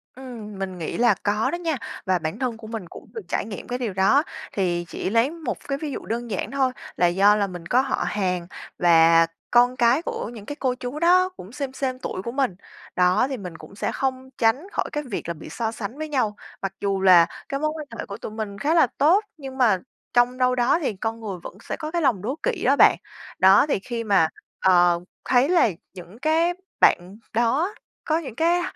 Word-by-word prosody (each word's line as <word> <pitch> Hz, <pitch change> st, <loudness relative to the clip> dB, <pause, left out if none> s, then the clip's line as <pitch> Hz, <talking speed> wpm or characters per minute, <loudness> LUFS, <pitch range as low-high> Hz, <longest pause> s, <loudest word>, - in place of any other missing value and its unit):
Ừm, 230 Hz, -6 st, -9 dB
mình 190 Hz, -1 st, -4 dB
nghĩ 165 Hz, -, -4 dB
là 240 Hz, 0 st, +5 dB
có 210 Hz, +2 st, +1 dB
đó -, -, -1 dB
nha, 330 Hz, -4 st, -2 dB, 0.3 s
và 185 Hz, -1 st, +2 dB
bản 160 Hz, +6 st, -4 dB
thân 250 Hz, -3 st, -2 dB
của 220 Hz, -1 st, -11 dB
mình 220 Hz, -4 st, -5 dB
cũng -, -, -12 dB
được 450 Hz, -, -5 dB
trải -, -, -1 dB
nghiệm 205 Hz, -3 st, -8 dB
cái 245 Hz, +1 st, -3 dB
điều 230 Hz, -6 st, -2 dB
đó. 195 Hz, +10 st, +4 dB, 0.3 s
Thì 175 Hz, -3 st, 0 dB
chỉ -, -, -4 dB
lấy 230 Hz, +6 st, +2 dB
một 330 Hz, -2 st, -4 dB
cái 275 Hz, -, -1 dB
ví 295 Hz, 0 st, -5 dB
dụ -, -, -6 dB
đơn 235 Hz, +1 st, -4 dB
giản 195 Hz, -, -3 dB
thôi 270 Hz, -2 st, +1 dB, 0.2 s
là 175 Hz, -, +3 dB
do 195 Hz, +4 st, +5 dB
là 205 Hz, -1 st, +1 dB
mình 175 Hz, -3 st, -8 dB
có 250 Hz, +6 st, +4 dB
họ 265 Hz, -, -1 dB
hàng 180 Hz, -4 st, -1 dB, 0.3 s
và 165 Hz, -1 st, +6 dB, 0.2 s
con 245 Hz, +1 st, +5 dB
cái 245 Hz, +4 st, +3 dB
của 335 Hz, -, -4 dB
những 215 Hz, -4 st, -10 dB
cái 290 Hz, -, -5 dB
cô 260 Hz, -4 st, -1 dB
chú 250 Hz, +3 st, -6 dB
đó 365 Hz, +2 st, +4 dB
cũng 185 Hz, -, -10 dB
xêm 270 Hz, 0 st, -5 dB
xêm 260 Hz, -1 st, -3 dB
tuổi 185 Hz, -, -4 dB
của 235 Hz, -, -5 dB
mình. 260 Hz, -7 st, 0 dB, 0.4 s
Đó, 180 Hz, +6 st, +3 dB
thì 265 Hz, -, -3 dB
mình 180 Hz, -6 st, -8 dB
cũng 200 Hz, -, -13 dB
sẽ -, -, -2 dB
không 260 Hz, -1 st, -2 dB
tránh 235 Hz, +10 st, +2 dB
khỏi -, -, -1 dB
cái 295 Hz, -, -2 dB
việc 240 Hz, -, -5 dB
là 170 Hz, -, -2 dB
bị 165 Hz, -, -11 dB
so 225 Hz, -2 st, -2 dB
sánh 225 Hz, +3 st, -6 dB
với 310 Hz, 0 st, -5 dB
nhau, 240 Hz, -8 st, 0 dB, 0.3 s
mặc 195 Hz, -1 st, -3 dB
dù 195 Hz, -1 st, 0 dB
là 180 Hz, -3 st, +7 dB, 0.2 s
cái 275 Hz, -, -2 dB
mối 305 Hz, +1 st, +1 dB
quan 305 Hz, -2 st, -7 dB
hệ -, -, -3 dB
của 200 Hz, -, -7 dB
tụi 220 Hz, -, -7 dB
mình 215 Hz, -2 st, -5 dB
khá 290 Hz, +8 st, +1 dB
là 330 Hz, -6 st, +5 dB
tốt, 340 Hz, +9 st, +4 dB
nhưng 270 Hz, -3 st, -8 dB
mà 230 Hz, -7 st, +4 dB, 0.4 s
trong 245 Hz, +1 st, +3 dB
đâu 255 Hz, 0 st, +2 dB
đó 245 Hz, +6 st, +3 dB
thì 265 Hz, -, -1 dB
con 225 Hz, +4 st, -3 dB
người 205 Hz, -4 st, -5 dB
vẫn -, -, -9 dB
sẽ -, -, -4 dB
có 310 Hz, -1 st, -5 dB
cái 345 Hz, 0 st, 0 dB
lòng 240 Hz, -, +2 dB
đố 245 Hz, +8 st, -2 dB
kỵ -, -, -1 dB
đó -, -, +5 dB
bạn. -, -, +6 dB, 0.4 s
Đó, 190 Hz, +6 st, +7 dB
thì 280 Hz, -, 0 dB
khi 230 Hz, +3 st, -4 dB
mà, 195 Hz, -7 st, +4 dB, 0.3 s
ờ, 175 Hz, -2 st, +4 dB, 0.3 s
thấy 255 Hz, +3 st, +3 dB
là 350 Hz, -9 st, +4 dB, 0.2 s
những 185 Hz, +4 st, -12 dB
cái 320 Hz, +4 st, +2 dB, 0.3 s
bạn 185 Hz, +3 st, +3 dB, 0.2 s
đó 265 Hz, -, +1 dB, 0.3 s
có 315 Hz, -, +2 dB
những 285 Hz, -9 st, -6 dB
cái, 340 Hz, +4 st, +2 dB
235 Hz, 230 wpm, -24 LUFS, 195-275 Hz, 0.4 s, là